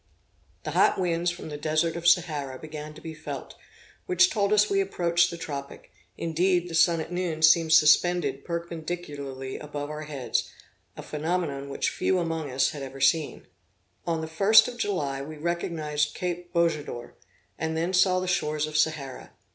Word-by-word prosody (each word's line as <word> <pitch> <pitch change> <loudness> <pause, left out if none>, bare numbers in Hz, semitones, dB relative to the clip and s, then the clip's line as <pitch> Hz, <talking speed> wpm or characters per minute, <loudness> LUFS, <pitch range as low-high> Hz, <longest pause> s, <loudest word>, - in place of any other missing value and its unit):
The - - -4
hot - - +3
winds 175 -1 +1
from 175 -2 -7
the 150 - -5
desert 155 +2 0
of 170 0 -2
Sahara 155 -7 +2
began 155 +1 -8
to 155 - -12
be 160 0 -7
felt, 155 - -7 0.5
which 370 0 +4
told 200 -2 +1
us 210 0 +5
we 195 -1 +2
approached 175 -3 +2
the 170 - -6
tropic; 140 -4 -7 0.3
indeed, 175 +2 +1
the - - -7
sun 165 0 +4
at 160 - -7
noon 175 -3 -2
seemed 160 +1 +5
suspended 155 -2 +4
perpendicularly 160 -6 -5
above 145 0 -6
our 150 0 -5
heads, 140 -4 -2 0.5
a - - -7
phenomenon 150 -3 -2
which 140 - -1
few 190 - 0
among 165 -4 -2
us 130 +1 +1
had 145 - -7
ever 135 0 -8
seen. 140 +3 +1 0.6
On 165 -1 0
the - - -3
1st 215 +8 +5
of 245 - -9
July, 150 - -1
we 155 +2 -8
recognised 155 -2 -2
Cape 175 -1 -4
Bojador, 155 -8 -1 0.5
and 160 +1 -2
then 170 +3 -1
saw 185 0 +4
the 185 - -3
shores 150 -3 0
of 155 0 -8
Sahara. 155 -4 -1
160 Hz, 170 wpm, -26 LUFS, 150-175 Hz, 0.6 s, us